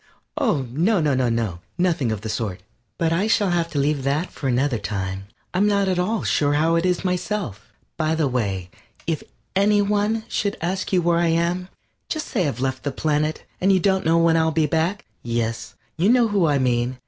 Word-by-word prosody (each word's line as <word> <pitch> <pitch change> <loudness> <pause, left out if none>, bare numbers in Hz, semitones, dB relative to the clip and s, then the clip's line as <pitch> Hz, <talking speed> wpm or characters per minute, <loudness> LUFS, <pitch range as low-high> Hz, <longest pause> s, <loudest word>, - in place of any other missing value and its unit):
Oh, 135 -3 +1
no, 180 - +2
no, 150 -3 +2
no, 115 -8 0 0.2
nothing 170 -10 +1
of 110 -2 -3
the 110 - -5
sort. 105 -4 -3 0.4
But 165 -1 +1
I 190 +6 +1
shall 205 -3 +2
have 170 -1 0
to 150 - -5
leave 140 0 +1
that 140 +6 -1
for 135 - -4
another 125 -1 +1
time. 95 -1 -4 0.3
I'm 200 +3 +3
not 200 -1 +2
at 185 -1 +1
all 215 +5 0
sure 145 -1 +2
how 160 +3 +2
it 165 +2 +2
is 180 +1 0
myself. 180 - -3 0.3
By 155 0 +1
the 160 -3 +1
way, 100 -8 -2 0.3
if 165 -3 -1 0.3
any 205 +2 +4
one 210 +2 +1
should 200 -1 -1
ask 185 +3 -2
you 180 -2 +2
where 170 0 +3
I 170 - +2
am, 170 +2 0 0.4
just 310 -1 -3
say 185 - +1
I've 125 -4 -3
left 130 0 -1
the 145 - -2
planet, 155 +2 -1 0.2
and 190 +2 +4
you 190 - +4
don't 190 +1 +2
know 165 +1 +3
when 165 -1 +4
I - - +4
shall 160 0 +3
be 160 0 +2
back. 165 +7 0 0.2
Yes, 115 -1 -3 0.2
you 180 +6 +3
know 240 -2 +4
who 195 -5 +2
I 145 -2 +3
mean. 125 -1 0
160 Hz, 210 wpm, -23 LUFS, 130-185 Hz, 0.4 s, any